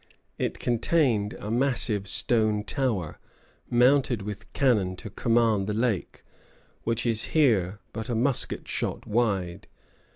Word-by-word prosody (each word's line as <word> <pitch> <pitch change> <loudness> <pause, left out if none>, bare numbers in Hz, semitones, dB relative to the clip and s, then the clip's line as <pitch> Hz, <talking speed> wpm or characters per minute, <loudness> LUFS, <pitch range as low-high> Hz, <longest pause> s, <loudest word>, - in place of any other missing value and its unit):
It - - -2
contained 120 -3 +1
a 105 - -7
massive 115 -5 +2
stone 110 0 +2
tower, 110 - -2 0.5
mounted 125 -2 +3
with 105 0 -8
cannon 105 -9 +1
to 105 +3 -9
command 115 -3 +1
the 105 - -2
lake, 115 -4 -2 0.6
which 115 +1 -2
is 115 -2 0
here 105 - +3 0.2
but 110 +1 -5
a 120 - -1
musket 125 +3 +1
shot - - -3
wide. 100 -6 -1
110 Hz, 125 wpm, -26 LUFS, 105-120 Hz, 0.6 s, mounted